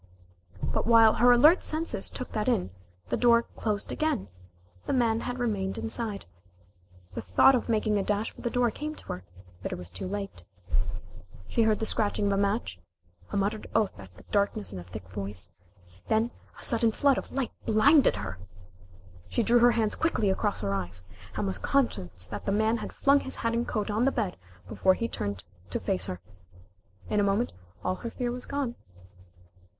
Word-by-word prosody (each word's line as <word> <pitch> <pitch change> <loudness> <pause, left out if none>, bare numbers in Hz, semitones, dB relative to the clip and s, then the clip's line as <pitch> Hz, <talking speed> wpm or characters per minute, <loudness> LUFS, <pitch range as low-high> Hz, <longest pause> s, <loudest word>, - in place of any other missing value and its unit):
But - - -1
while 225 -2 +7
her 245 +2 +5
alert 300 +9 +7
senses 320 +2 -1
took 255 - -5
that 210 -1 -2
in, 90 +1 +1 0.4
the - - 0
door 235 -1 +5
closed 210 -3 -3
again 305 - -1 0.6
the - - 0
man 230 -3 +2
had 245 +1 -4
remained 205 -6 -1
inside. 225 -2 -3 0.9
The - - -4
thought 90 - +5
of 250 -1 0
making 215 -2 +2
a - - 0
dash 210 +2 -1
for - - -13
the 240 - -1
door 245 -1 +2
came 305 +5 -5
to - - -14
her, 90 - -4 0.4
but - - -4
it - - -2
was 90 0 -7
too 95 - -5
late. 195 - -5 1.1
She - - +1
heard 220 -1 +3
the 220 - -2
scratching 210 -1 +2
of 200 - +2
a 200 - +1
match 200 - 0 0.5
a - - -1
muttered 205 +2 -1
oath 215 -3 +2
at 95 -2 -13
the - - -14
darkness 200 - +1
in 95 - -5
a - - -8
thick 90 0 -9
voice 100 0 -6 0.6
then 220 +2 +2 0.3
a - - -11
sudden 230 -1 +4
flood 275 +4 +3
of - - -10
light 270 -2 -2 0.2
blinded 275 +7 +5
her. 100 -2 -5 0.9
She 90 - +1
drew 240 +1 +5
her 240 0 +6
hands 220 -2 +1
quickly 220 -11 +1
across 205 +1 -1
her 100 -1 -1
eyes, 90 -2 -3 0.3
and 105 +1 -1
was 95 0 -1
conscious 90 - 0
that 105 +3 -6
the - - +2
man 220 +3 +2
had - - -6
flung 280 +1 +4
his 265 - -6
hat 230 0 -1
and 235 +1 0
coat 210 -1 -1
on 220 +4 +2
the 275 - +4
bed 210 -8 -1 0.3
before 185 - +3
he 230 - -2
turned 100 - -4 0.3
to - - -1
face 90 0 -1
her. 90 - -4 0.9
In 210 - +1
a - - +3
moment 200 +4 +1 0.3
all 185 +1 0
her 235 - -5
fear 240 +1 -3
was 250 +1 -5
gone. 280 -4 -2
215 Hz, 195 wpm, -28 LUFS, -, 1.1 s, while